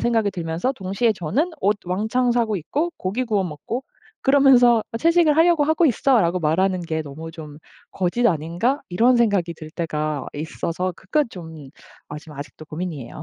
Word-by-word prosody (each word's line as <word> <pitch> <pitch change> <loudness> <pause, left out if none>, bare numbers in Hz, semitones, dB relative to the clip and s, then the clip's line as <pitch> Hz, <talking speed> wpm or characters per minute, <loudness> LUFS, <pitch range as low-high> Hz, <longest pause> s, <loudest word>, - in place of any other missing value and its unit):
생각이 225 -4 +1
들면서 175 +7 -2
동시에 215 +2 0
저는 215 - -1
옷 205 +2 +2
왕창 220 +7 0
사고 225 -4 +1
있고 290 - -2
고기 210 +8 -2
구워 210 -4 0
먹고 180 - -5 0.4
그러면서 265 -4 +6
어 - - -3
"채식을 330 -1 +4
하려고 330 -2 +4
하고 315 +3 +2
있어."라고 225 - +3
말하는 180 +3 +1
게 160 -2 -3
너무 155 +3 -9
좀 150 -3 -10 0.3
'거짓 190 +6 -1
아닌가.' 175 - 0
이런 235 +8 +3
생각이 200 -7 +2
들 155 0 -10
때가 155 -4 -3
있어서 170 +4 -3
그건 290 +13 0
좀 160 -8 -10 0.4
아 150 - -7
좀 150 0 -13
아직도 145 +2 -9
고민이에요. 155 -4 -6
190 Hz, 350 characters per minute, -22 LUFS, 160-245 Hz, 0.4 s, 그러면서